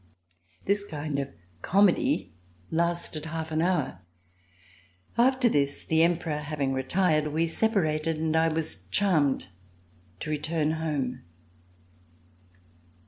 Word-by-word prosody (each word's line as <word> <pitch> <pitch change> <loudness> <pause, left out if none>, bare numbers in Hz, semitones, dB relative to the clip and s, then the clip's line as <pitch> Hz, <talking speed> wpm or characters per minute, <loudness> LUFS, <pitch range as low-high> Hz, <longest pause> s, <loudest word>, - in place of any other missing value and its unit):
This 200 +1 +1
kind 150 -6 -4
of 140 - -3 0.3
comedy 195 - +2 0.4
lasted 170 -2 -1
half 160 0 -4
an 155 0 +1
hour. 180 +1 0 1.2
After 255 +1 +4
this, 140 -8 0
the 160 0 +3
Emperor 165 -2 +1
having 145 -3 -2
retired, 155 +3 +1
we 160 +2 +1
separated, 165 -5 +1
and 160 0 0
I 160 0 +4
was 155 - -2
charmed 145 - +2 0.7
to 155 - -3
return 155 +1 0
home. 145 -6 -2
160 Hz, 105 wpm, -27 LUFS, 150-170 Hz, 1.2 s, After